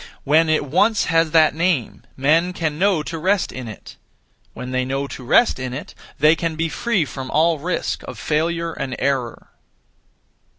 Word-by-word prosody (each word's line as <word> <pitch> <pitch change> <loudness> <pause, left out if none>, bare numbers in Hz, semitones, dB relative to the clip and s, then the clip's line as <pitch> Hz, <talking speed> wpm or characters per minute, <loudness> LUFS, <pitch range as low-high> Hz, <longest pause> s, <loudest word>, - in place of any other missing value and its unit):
When 155 +3 +3
it 155 -2 +1
once 205 +10 +2
has 165 0 +2
that 155 -1 +4
name, 165 -6 -1 0.2
(men) 160 +7 +2
can 160 -3 -3
know 190 -5 +2
to 165 +1 -5
rest 190 +3 +1
in 130 -2 -7
it. 110 - -11 0.6
When 125 0 -6
they 130 0 0
know 135 +2 -2
to 135 - -8
rest 220 - +3
in 130 0 -4
it, 145 - -8 0.2
they 155 +2 +5
can 165 -1 -3
be 165 +1 -1
free 205 -3 0
from 130 0 -7
all 160 +1 +2
risk 175 +4 -2
of - - -7
failure 165 +2 -1
and 130 -4 -4
error. 130 -3 -2
155 Hz, 175 wpm, -21 LUFS, 135-170 Hz, 0.6 s, they